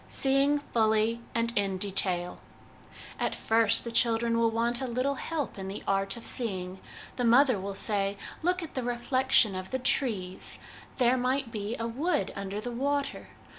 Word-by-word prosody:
Seeing 275 Hz, +2 st, +2 dB
Fully 225 Hz, -3 st, +1 dB
and 230 Hz, 0 st, 0 dB
in 195 Hz, -2 st, 0 dB
Detail. 185 Hz, -2 st, 0 dB, 0.8 s
At -, -, -1 dB
first 225 Hz, 0 st, +3 dB
the 235 Hz, -, -5 dB
children 230 Hz, 0 st, +2 dB
will 230 Hz, 0 st, +3 dB
want 235 Hz, +2 st, +1 dB
a 260 Hz, -, -2 dB
little 255 Hz, +3 st, -1 dB
help 290 Hz, -6 st, -4 dB
in 190 Hz, -, -5 dB
the 195 Hz, -, -6 dB
art 195 Hz, +2 st, 0 dB
of 230 Hz, -, -11 dB
seeing. 190 Hz, -6 st, -2 dB, 0.4 s
The 250 Hz, -, -1 dB
mother 245 Hz, -1 st, +4 dB
will 195 Hz, +1 st, -5 dB
say, 200 Hz, -1 st, +1 dB
' -, -, -16 dB
Look 360 Hz, +2 st, 0 dB
at 320 Hz, -, -9 dB
the 260 Hz, -, -2 dB
reflection 245 Hz, -2 st, +2 dB
of 185 Hz, 0 st, -6 dB
the 260 Hz, -, -1 dB
trees! 220 Hz, -8 st, 0 dB, 0.4 s
There 250 Hz, 0 st, +3 dB
might 255 Hz, 0 st, -1 dB
be 210 Hz, +1 st, -4 dB
a 230 Hz, -, -3 dB
wood 245 Hz, -, -1 dB
under 200 Hz, +1 st, -4 dB
the 240 Hz, +3 st, -5 dB
water. 280 Hz, +3 st, -2 dB
230 Hz, 170 wpm, -28 LUFS, 200-260 Hz, 0.8 s, mother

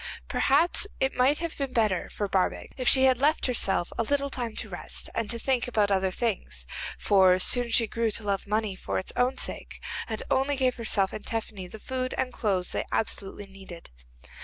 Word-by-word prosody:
Perhaps 350 Hz, +4 st, +3 dB
it 265 Hz, 0 st, +1 dB
might 260 Hz, +4 st, +3 dB
have 335 Hz, -1 st, -4 dB
been 275 Hz, -2 st, -3 dB
better 215 Hz, -6 st, +1 dB
for 205 Hz, -, -3 dB
Barbaik 190 Hz, -1 st, -1 dB
if 255 Hz, -2 st, -3 dB
she 260 Hz, +2 st, +7 dB
had 260 Hz, -2 st, +4 dB
left 300 Hz, +3 st, +2 dB
herself 200 Hz, -8 st, +1 dB
a -, -, +3 dB
little 280 Hz, +3 st, 0 dB
time 240 Hz, -4 st, -3 dB
to -, -, -5 dB
rest -, -, -4 dB
and 230 Hz, -2 st, -2 dB
to 235 Hz, -, -3 dB
think 250 Hz, 0 st, 0 dB
about 210 Hz, -4 st, +1 dB
other 190 Hz, -1 st, +2 dB
things, 185 Hz, -, -3 dB, 0.3 s
for 190 Hz, -2 st, +5 dB
soon 240 Hz, +5 st, +3 dB
she 230 Hz, 0 st, +4 dB
grew 230 Hz, +1 st, -1 dB
to 215 Hz, +1 st, -4 dB
love 200 Hz, -1 st, -2 dB
money 210 Hz, -1 st, 0 dB
for -, -, -3 dB
its 185 Hz, -, -2 dB
own 250 Hz, +2 st, +1 dB
sake, -, -, -2 dB, 0.3 s
and 220 Hz, -1 st, -4 dB
only 270 Hz, +2 st, +2 dB
gave 260 Hz, -2 st, +2 dB
herself 205 Hz, -4 st, +1 dB
and 215 Hz, -, -7 dB
Tephany 215 Hz, -4 st, -4 dB
the 220 Hz, -, -9 dB
food 255 Hz, +3 st, -3 dB
and 255 Hz, -1 st, -1 dB
clothes 190 Hz, -5 st, -1 dB
they -, -, -1 dB
absolutely 205 Hz, -2 st, -2 dB
needed. 195 Hz, -, -12 dB
225 Hz, 200 wpm, -27 LUFS, 195-255 Hz, 0.3 s, she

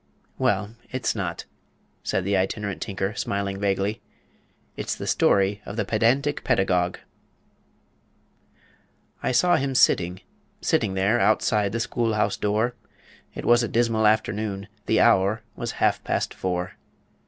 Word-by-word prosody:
"Well, 100 Hz, +1 st, +1 dB, 0.2 s
it's 130 Hz, 0 st, -1 dB
not," 90 Hz, -6 st, -4 dB, 0.6 s
said 95 Hz, -, -1 dB
the 100 Hz, +1 st, +1 dB
Itinerant 100 Hz, +1 st, -2 dB
Tinker, 95 Hz, -1 st, -2 dB
smiling 100 Hz, -1 st, -2 dB
vaguely. 100 Hz, +1 st, -1 dB, 0.7 s
"It's -, -, -3 dB
the -, -, -6 dB
story 100 Hz, +1 st, +2 dB
of 100 Hz, -, -7 dB
the 110 Hz, -2 st, -1 dB
PEDANTIC 125 Hz, +8 st, +1 dB
PEDAGOGUE 90 Hz, -7 st, +1 dB, 2.2 s
"I -, -, 0 dB
saw 175 Hz, +8 st, +4 dB
him 135 Hz, 0 st, -2 dB
sitting 90 Hz, -5 st, +3 dB, 0.4 s
sitting 95 Hz, -, 0 dB
there, 100 Hz, +5 st, +2 dB
Outside 105 Hz, -2 st, +2 dB
the 115 Hz, -, -2 dB
school 115 Hz, -1 st, -1 dB
house 105 Hz, -, +1 dB
door, 110 Hz, +4 st, 0 dB, 0.6 s
It -, -, -6 dB
was 120 Hz, 0 st, +5 dB
a 120 Hz, -, 0 dB
dismal 115 Hz, -1 st, +2 dB
afternoon; 105 Hz, -2 st, 0 dB, 0.2 s
The 110 Hz, -, +3 dB
hour 110 Hz, 0 st, +3 dB
was 120 Hz, -1 st, -4 dB
half -, -, +1 dB
past -, -, -1 dB
four. 90 Hz, -1 st, -3 dB
105 Hz, 130 wpm, -24 LUFS, 95-115 Hz, 2.2 s, was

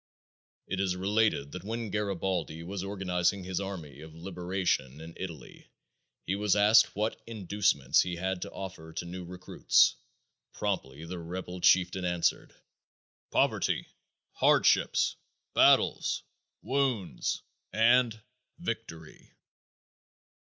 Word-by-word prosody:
It 95 Hz, -, -3 dB
is 95 Hz, -2 st, +1 dB
related 100 Hz, -6 st, +1 dB
that 90 Hz, -, -7 dB
when 115 Hz, 0 st, -4 dB
Garibaldi 95 Hz, -5 st, -2 dB
was 95 Hz, +2 st, -5 dB
organizing 95 Hz, -1 st, 0 dB
his 90 Hz, 0 st, -3 dB
army 85 Hz, -8 st, -6 dB
of 80 Hz, 0 st, -11 dB
liberation 90 Hz, -5 st, -2 dB
in 80 Hz, +1 st, -9 dB
Italy, 80 Hz, -9 st, -9 dB, 0.6 s
he 95 Hz, -, 0 dB
was 105 Hz, -1 st, +2 dB
asked 105 Hz, +2 st, +5 dB
what 105 Hz, +2 st, -2 dB
inducements 100 Hz, -, +2 dB
he 90 Hz, -1 st, -2 dB
had 95 Hz, +1 st, -2 dB
to -, -, -5 dB
offer 90 Hz, -4 st, -8 dB
to 85 Hz, -, -4 dB
new 90 Hz, +1 st, -6 dB
recruits. 90 Hz, +1 st, +2 dB, 0.6 s
Promptly 65 Hz, +5 st, -3 dB
the 90 Hz, +1 st, -6 dB
rebel 90 Hz, +1 st, -6 dB
chieftain 90 Hz, +1 st, +4 dB
answered: 90 Hz, -1 st, 0 dB, 0.7 s
"Poverty, -, -, +1 dB, 0.5 s
hardships, -, -, +3 dB, 0.4 s
battles, -, -, +4 dB, 0.4 s
wounds, 120 Hz, -, -1 dB, 0.3 s
and 115 Hz, 0 st, +4 dB, 0.4 s
victory!" 175 Hz, -, -7 dB
95 Hz, 110 wpm, -30 LUFS, 85-100 Hz, 0.7 s, asked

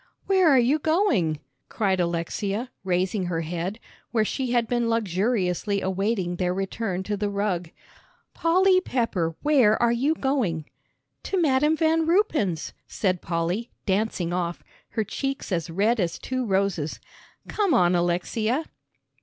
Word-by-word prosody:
"Where 375 Hz, -3 st, +4 dB
are 275 Hz, -, +6 dB
you 255 Hz, +5 st, +3 dB
going?" 275 Hz, -, +1 dB, 0.3 s
cried 195 Hz, -4 st, 0 dB
Alexia, 195 Hz, +7 st, -2 dB
raising 185 Hz, +1 st, 0 dB
her 165 Hz, -2 st, -1 dB
head, 175 Hz, +6 st, -4 dB, 0.3 s
where 220 Hz, -3 st, +1 dB
she 260 Hz, +3 st, -2 dB
had 240 Hz, -2 st, +2 dB
been 240 Hz, -1 st, 0 dB
luxuriously 200 Hz, -2 st, 0 dB
awaiting 190 Hz, -1 st, -1 dB
their 180 Hz, 0 st, 0 dB
return 195 Hz, 0 st, -2 dB
to 205 Hz, +2 st, -2 dB
the 205 Hz, 0 st, -1 dB
rug. 200 Hz, -4 st, -1 dB, 0.6 s
"Polly 370 Hz, +3 st, +3 dB
Pepper, 215 Hz, -, -1 dB
where 260 Hz, -8 st, +4 dB
are 235 Hz, -1 st, +3 dB
you 270 Hz, +7 st, +1 dB
going?" 240 Hz, -, -1 dB, 0.6 s
"To 385 Hz, -, -1 dB
Madam 300 Hz, 0 st, +3 dB
Van 320 Hz, 0 st, +2 dB
Ruypen's," 305 Hz, -, +1 dB
said 185 Hz, -4 st, -1 dB
Polly, 175 Hz, +7 st, -2 dB, 0.2 s
dancing 190 Hz, -4 st, 0 dB
off, 175 Hz, -1 st, -2 dB, 0.3 s
her 220 Hz, -, -1 dB
cheeks 270 Hz, +3 st, -4 dB
as 170 Hz, -1 st, -1 dB
red 210 Hz, +7 st, +1 dB
as 175 Hz, -3 st, -1 dB
two 255 Hz, -2 st, -3 dB
roses. 190 Hz, -6 st, 0 dB, 0.5 s
"Come 405 Hz, -5 st, +1 dB
on, 175 Hz, 0 st, +4 dB
Alexia." 200 Hz, -, 0 dB
210 Hz, 135 wpm, -25 LUFS, 180-260 Hz, 0.6 s, are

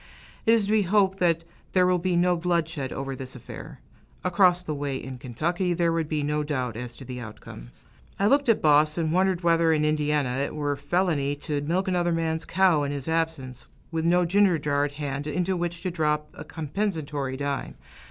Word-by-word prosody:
It 225 Hz, -, +7 dB
is 220 Hz, -3 st, +1 dB
to 205 Hz, -, -2 dB
be 215 Hz, -1 st, +4 dB
hoped 195 Hz, 0 st, +2 dB
that 165 Hz, -2 st, +2 dB, 0.3 s
there 185 Hz, -1 st, +4 dB
will 180 Hz, 0 st, +3 dB
be 180 Hz, 0 st, 0 dB
no 175 Hz, +1 st, +3 dB
bloodshed 165 Hz, -5 st, -1 dB
over 135 Hz, 0 st, -4 dB
this 130 Hz, 0 st, -8 dB
affair; 125 Hz, -, -10 dB, 0.4 s
across 180 Hz, 0 st, +3 dB
the 155 Hz, -, -3 dB
way, 145 Hz, -2 st, -3 dB
in 130 Hz, -1 st, -8 dB
Kentucky, 170 Hz, +9 st, -1 dB
there 170 Hz, -1 st, +2 dB
would 165 Hz, -2 st, -1 dB
be 150 Hz, -2 st, -1 dB
no 150 Hz, +1 st, 0 dB
doubt 130 Hz, -6 st, -2 dB
as 120 Hz, +1 st, -6 dB
to 135 Hz, -, -11 dB
the 125 Hz, 0 st, -6 dB
outcome. 105 Hz, -, -10 dB, 0.5 s
I 200 Hz, -, +1 dB
looked 280 Hz, +4 st, +3 dB
at 230 Hz, -, +3 dB
Boss, 150 Hz, +1 st, +4 dB
and 160 Hz, -2 st, 0 dB
wondered 185 Hz, 0 st, +2 dB
whether 165 Hz, -1 st, +4 dB
in 150 Hz, -1 st, +2 dB
Indiana 150 Hz, -4 st, +1 dB
it 140 Hz, -, -2 dB
were 145 Hz, -1 st, -1 dB
felony 145 Hz, -1 st, 0 dB
to 150 Hz, -2 st, -2 dB
milk 175 Hz, +6 st, -1 dB
another 175 Hz, -2 st, +1 dB
man's 160 Hz, -1 st, -1 dB
cow 185 Hz, -5 st, +3 dB
in 140 Hz, -1 st, -1 dB
his 140 Hz, -1 st, -4 dB
absence, 160 Hz, -6 st, -2 dB, 0.2 s
with 165 Hz, 0 st, -1 dB
no 175 Hz, +1 st, +4 dB
ginger 190 Hz, 0 st, +4 dB
jar 145 Hz, -1 st, 0 dB
at 145 Hz, -, -5 dB
hand, 145 Hz, 0 st, -4 dB
into 180 Hz, +5 st, 0 dB
which 170 Hz, -1 st, -3 dB
to 185 Hz, -, -1 dB
drop 150 Hz, -2 st, 0 dB
a -, -, -9 dB
compensatory 150 Hz, -5 st, -3 dB
dime. 140 Hz, 0 st, -3 dB
160 Hz, 200 wpm, -26 LUFS, 145-180 Hz, 0.5 s, It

